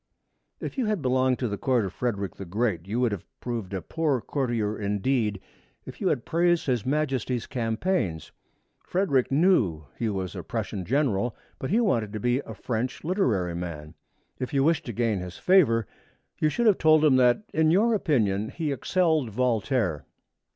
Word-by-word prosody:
If -, -, -5 dB
you 245 Hz, -, +1 dB
had 210 Hz, -7 st, -1 dB
belonged 130 Hz, 0 st, +2 dB
to 125 Hz, -, -1 dB
the 100 Hz, -2 st, -4 dB
court 125 Hz, -5 st, +1 dB
of 95 Hz, -, -5 dB
Frederick 100 Hz, -6 st, -2 dB
the -, -, -6 dB
Great, 95 Hz, -2 st, -1 dB
you 110 Hz, +4 st, -1 dB
would 125 Hz, -3 st, +2 dB
have 100 Hz, -4 st, -4 dB, 0.2 s
proved 115 Hz, -6 st, -4 dB
a 95 Hz, -2 st, -4 dB
poor 155 Hz, -5 st, 0 dB
courtier 115 Hz, -3 st, -1 dB
indeed 105 Hz, +1 st, 0 dB, 0.5 s
if -, -, -10 dB
you -, -, +1 dB
had -, -, 0 dB
praised 175 Hz, 0 st, +2 dB
His 125 Hz, -4 st, -1 dB
Majesty's 130 Hz, -5 st, -1 dB
campaigns. 115 Hz, -, -2 dB, 0.5 s
Frederick 160 Hz, -10 st, +1 dB
knew 135 Hz, -, +3 dB
that 70 Hz, -, -22 dB
he 115 Hz, -, 0 dB
was 95 Hz, -3 st, -3 dB
a -, -, -4 dB
Prussian 95 Hz, -3 st, -4 dB
general, 120 Hz, -, 0 dB, 0.2 s
but 130 Hz, -, -4 dB
he 220 Hz, -, +3 dB
wanted 115 Hz, -, +1 dB
to 110 Hz, -, -3 dB
be 125 Hz, +4 st, +1 dB
a -, -, -8 dB
French 125 Hz, +2 st, -3 dB
literary 120 Hz, -, 0 dB
man. 85 Hz, -3 st, -6 dB, 0.5 s
If 130 Hz, +2 st, -4 dB
you 135 Hz, -, +3 dB
wished 160 Hz, -1 st, +1 dB
to -, -, -2 dB
gain 115 Hz, -3 st, 0 dB
his 90 Hz, -1 st, -7 dB
favor, 135 Hz, -, +4 dB, 0.5 s
you 155 Hz, -, +3 dB
should 235 Hz, +10 st, -1 dB
have 210 Hz, -4 st, +4 dB
told 155 Hz, -1 st, +5 dB
him 135 Hz, -4 st, +5 dB
that 125 Hz, -, +4 dB
in 160 Hz, 0 st, +3 dB
your 215 Hz, +8 st, +4 dB
opinion 110 Hz, -, +1 dB
he 160 Hz, -3 st, -3 dB
excelled 160 Hz, 0 st, +1 dB
Voltaire. 115 Hz, -, 0 dB
125 Hz, 180 wpm, -26 LUFS, 105-155 Hz, 0.5 s, told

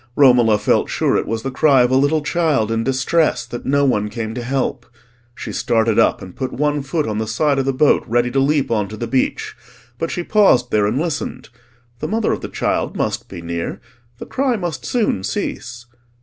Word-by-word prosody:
Romola 125 Hz, -6 st, +5 dB
felt -, -, +1 dB
sure -, -, +1 dB
it -, -, 0 dB
was 110 Hz, 0 st, -3 dB
the 135 Hz, -, -3 dB
cry 135 Hz, -1 st, +4 dB
of 125 Hz, -, +1 dB
a -, -, +3 dB
little 145 Hz, +3 st, +2 dB
child 145 Hz, -9 st, +1 dB
in 115 Hz, 0 st, 0 dB
distress 135 Hz, +6 st, +1 dB
that 120 Hz, -, -7 dB
no 140 Hz, +1 st, +3 dB
one 105 Hz, -5 st, +1 dB
came 110 Hz, 0 st, -5 dB
to 125 Hz, -, -5 dB
help. 130 Hz, 0 st, -2 dB, 0.5 s
She -, -, -6 dB
started 115 Hz, -2 st, +1 dB
up -, -, +2 dB
and 90 Hz, -1 st, -11 dB
put 130 Hz, -2 st, -4 dB
one 150 Hz, +1 st, 0 dB
foot 145 Hz, +3 st, -2 dB
on 105 Hz, -1 st, -2 dB
the 110 Hz, -, -2 dB
side 140 Hz, +5 st, +1 dB
of 135 Hz, -, 0 dB
the 135 Hz, -, +1 dB
boat 140 Hz, +3 st, +3 dB
ready 120 Hz, +1 st, +1 dB
to 135 Hz, -, +1 dB
leap 140 Hz, -1 st, +1 dB
on 105 Hz, -3 st, +1 dB
to 110 Hz, +2 st, -8 dB
the 120 Hz, -, -3 dB
beach; 130 Hz, +3 st, -1 dB, 0.4 s
but 165 Hz, -, -2 dB
she 175 Hz, -, -3 dB
paused 170 Hz, -, +3 dB
there 105 Hz, -1 st, +2 dB
and 110 Hz, +5 st, -1 dB
listened: 160 Hz, -3 st, -4 dB, 0.5 s
the -, -, -3 dB
mother 220 Hz, 0 st, 0 dB
of -, -, -4 dB
the -, -, -6 dB
child -, -, -2 dB
must -, -, -2 dB
be 85 Hz, -, -8 dB
near, 85 Hz, 0 st, -4 dB, 0.4 s
the -, -, -8 dB
cry 260 Hz, -2 st, 0 dB
must 170 Hz, -, -4 dB
soon 215 Hz, -, 0 dB
cease. 120 Hz, +4 st, -4 dB
130 Hz, 215 wpm, -19 LUFS, 115-150 Hz, 0.5 s, Romola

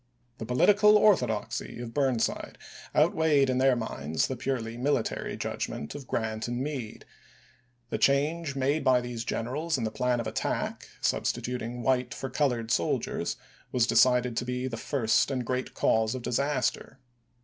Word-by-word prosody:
The 115 Hz, -, -5 dB
political 210 Hz, -, +5 dB
orthodoxy 125 Hz, -, +1 dB
of 120 Hz, -1 st, -7 dB
Burnside 130 Hz, -5 st, 0 dB, 0.4 s
outweighed 150 Hz, -4 st, +3 dB
in 130 Hz, -, 0 dB
their 130 Hz, -1 st, +4 dB
minds 80 Hz, -, -2 dB
the 130 Hz, -, -3 dB
purely 120 Hz, -3 st, -3 dB
military 130 Hz, -1 st, -1 dB
judgment 75 Hz, -, -4 dB
of 140 Hz, -3 st, -9 dB
Grant 110 Hz, 0 st, -2 dB
and 120 Hz, 0 st, -3 dB
Meade; 130 Hz, -5 st, -5 dB, 0.9 s
the -, -, -1 dB
change 145 Hz, +2 st, +1 dB
made 140 Hz, +3 st, 0 dB
by 130 Hz, -1 st, +4 dB
these 120 Hz, -2 st, -5 dB
generals 145 Hz, +9 st, -2 dB
in 120 Hz, -, -3 dB
the 110 Hz, -, -1 dB
plan 125 Hz, +1 st, 0 dB
of 115 Hz, -, -3 dB
attack, 110 Hz, 0 st, -3 dB
substituting 125 Hz, -1 st, -2 dB
white 125 Hz, +1 st, +1 dB
for 135 Hz, -, -5 dB
colored 125 Hz, -5 st, 0 dB
soldiers, 85 Hz, -, 0 dB, 0.4 s
was 125 Hz, -2 st, +3 dB
decided 125 Hz, +1 st, +3 dB
to -, -, 0 dB
be 125 Hz, +1 st, -2 dB
"the 125 Hz, -, -4 dB
first 115 Hz, 0 st, +1 dB
and 130 Hz, -3 st, -2 dB
great 125 Hz, +1 st, -3 dB
cause 110 Hz, +1 st, +2 dB
of 125 Hz, -, -6 dB
disaster." 140 Hz, +3 st, -1 dB
125 Hz, 150 wpm, -28 LUFS, 115-140 Hz, 0.9 s, political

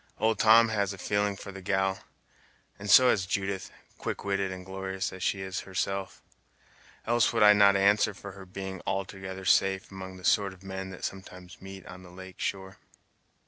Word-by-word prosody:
Old 110 Hz, -1 st, +1 dB
Tom 115 Hz, +1 st, +6 dB
has 100 Hz, -2 st, 0 dB
a -, -, -9 dB
feeling 100 Hz, +2 st, 0 dB
for 100 Hz, -, -9 dB
the 95 Hz, 0 st, -9 dB
gal, 95 Hz, +1 st, 0 dB, 0.8 s
and 105 Hz, +1 st, -6 dB
so 125 Hz, +6 st, +8 dB
has 95 Hz, -3 st, 0 dB
Judith, 95 Hz, -2 st, -2 dB, 0.3 s
quick -, -, -4 dB
witted 100 Hz, -1 st, 0 dB
and 90 Hz, -1 st, -8 dB
glorious 95 Hz, 0 st, -4 dB
as 95 Hz, -, -9 dB
she 95 Hz, +2 st, 0 dB
is 95 Hz, -1 st, -4 dB
herself; 95 Hz, -1 st, -4 dB, 0.8 s
else 120 Hz, -1 st, +3 dB
would -, -, +2 dB
I 105 Hz, 0 st, +9 dB
not 100 Hz, -1 st, +6 dB
answer 100 Hz, +2 st, +3 dB
for 100 Hz, -, -9 dB
her 95 Hz, 0 st, -12 dB
being 95 Hz, 0 st, -6 dB
altogether 95 Hz, -1 st, -4 dB
safe 95 Hz, +2 st, +2 dB
among 95 Hz, -1 st, -8 dB
the 90 Hz, -, -10 dB
sort 100 Hz, -2 st, +2 dB
of 95 Hz, +1 st, -18 dB
men 95 Hz, 0 st, -6 dB
that 95 Hz, -, -6 dB
sometimes 90 Hz, -1 st, -9 dB
meet 95 Hz, 0 st, -10 dB
on 90 Hz, 0 st, -10 dB
the 90 Hz, -, -13 dB
lake 95 Hz, +1 st, -12 dB
shore." 95 Hz, 0 st, -4 dB
95 Hz, 185 wpm, -28 LUFS, 95-100 Hz, 0.8 s, I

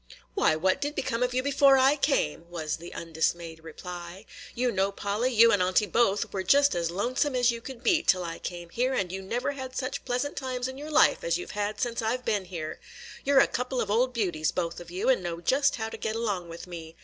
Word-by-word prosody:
"Why, 155 Hz, -, +3 dB
what 185 Hz, +4 st, +1 dB
did 290 Hz, +1 st, -2 dB
become 245 Hz, -3 st, -2 dB
of 250 Hz, 0 st, 0 dB
you 255 Hz, -, +1 dB
before 275 Hz, 0 st, +5 dB
I 265 Hz, +2 st, +5 dB
came?" 170 Hz, -, 0 dB
was 160 Hz, -3 st, -3 dB
the 170 Hz, +1 st, -10 dB
undismayed 165 Hz, 0 st, -2 dB
reply. 175 Hz, +4 st, -8 dB, 0.3 s
"You 245 Hz, 0 st, +1 dB
know, 195 Hz, 0 st, +1 dB
Polly, 205 Hz, +6 st, -1 dB
you 230 Hz, -1 st, +6 dB
and 205 Hz, -, +3 dB
Aunty 185 Hz, +3 st, +3 dB
both 210 Hz, 0 st, +1 dB
were 195 Hz, -, -1 dB
just 280 Hz, +9 st, +4 dB
as 170 Hz, -1 st, -1 dB
lonesome 250 Hz, -, 0 dB
as 245 Hz, -1 st, +4 dB
you 235 Hz, 0 st, -6 dB
could 255 Hz, 0 st, -9 dB
be 335 Hz, -4 st, +3 dB
till 185 Hz, -1 st, +2 dB
I 165 Hz, -1 st, -5 dB
came 175 Hz, -1 st, -6 dB
here, 255 Hz, +5 st, 0 dB
and 185 Hz, -7 st, -1 dB
you 190 Hz, +1 st, -4 dB
never 240 Hz, +8 st, -2 dB
had 260 Hz, -2 st, -7 dB
such 260 Hz, +1 st, -3 dB
pleasant 250 Hz, +3 st, -2 dB
times 255 Hz, -2 st, -3 dB
in 260 Hz, +1 st, -7 dB
your 300 Hz, +2 st, -7 dB
life 310 Hz, +9 st, +4 dB
as -, -, +1 dB
you 360 Hz, -, -6 dB
've -, -, -10 dB
had 210 Hz, 0 st, -3 dB
since 235 Hz, -2 st, -1 dB
I 225 Hz, +3 st, 0 dB
've 250 Hz, -, -21 dB
been 205 Hz, -4 st, 0 dB
here. 165 Hz, -4 st, -6 dB, 0.4 s
You 280 Hz, -, +1 dB
're 270 Hz, -, +9 dB
a -, -, +6 dB
couple 250 Hz, +1 st, -2 dB
of 205 Hz, -, -1 dB
old 250 Hz, +4 st, +2 dB
beauties, 180 Hz, -10 st, 0 dB
both 170 Hz, -2 st, -3 dB
of 175 Hz, -1 st, -11 dB
you, 180 Hz, +2 st, -3 dB
and 260 Hz, -7 st, +4 dB
know 170 Hz, -1 st, -4 dB
just 270 Hz, -, +2 dB
how 220 Hz, -1 st, -3 dB
to -, -, -8 dB
get 220 Hz, -, -3 dB
along 200 Hz, -7 st, -2 dB
with 165 Hz, 0 st, -8 dB
me. 165 Hz, -2 st, -9 dB
220 Hz, 245 wpm, -28 LUFS, 175-255 Hz, 0.4 s, re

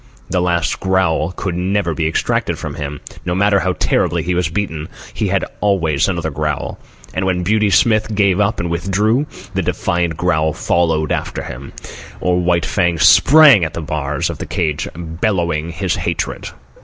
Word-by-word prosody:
The 90 Hz, -, +1 dB
last 85 Hz, -2 st, 0 dB
growl 95 Hz, -4 st, +1 dB
could 90 Hz, -1 st, -4 dB
never 90 Hz, -1 st, 0 dB
be 80 Hz, 0 st, -1 dB
extracted 80 Hz, -, -1 dB
from -, -, -5 dB
him. 75 Hz, 0 st, -6 dB, 0.2 s
No 90 Hz, 0 st, -2 dB
matter 100 Hz, +1 st, +3 dB
how 95 Hz, -1 st, 0 dB
terribly 85 Hz, -1 st, 0 dB
he 90 Hz, +3 st, -1 dB
was 90 Hz, -2 st, 0 dB
beaten, 80 Hz, -4 st, -3 dB, 0.2 s
he -, -, -1 dB
had -, -, 0 dB
always 85 Hz, -8 st, +1 dB
another -, -, -2 dB
growl; -, -, -3 dB, 0.3 s
and 95 Hz, -, -1 dB
when 90 Hz, -1 st, 0 dB
Beauty 105 Hz, +2 st, +2 dB
Smith 110 Hz, +2 st, +2 dB
gave 100 Hz, -2 st, +2 dB
up 105 Hz, +2 st, +1 dB
and 85 Hz, -1 st, -2 dB
withdrew, 105 Hz, -, +1 dB, 0.3 s
the 95 Hz, -, 0 dB
defiant 85 Hz, -1 st, -1 dB
growl 80 Hz, -3 st, +1 dB
followed 80 Hz, -3 st, 0 dB
after -, -, -2 dB
him, 70 Hz, +2 st, -8 dB, 0.5 s
or 90 Hz, 0 st, +1 dB
White 85 Hz, -1 st, +1 dB
Fang 85 Hz, -3 st, +1 dB
sprang 145 Hz, -, +7 dB
at 80 Hz, -1 st, -3 dB
the -, -, -3 dB
bars 75 Hz, -2 st, -2 dB
of -, -, -9 dB
the -, -, -5 dB
cage 75 Hz, -4 st, -1 dB
bellowing 85 Hz, -1 st, -1 dB
his 85 Hz, +2 st, -2 dB
hatred. -, -, -3 dB
90 Hz, 170 wpm, -17 LUFS, 80-95 Hz, 0.5 s, sprang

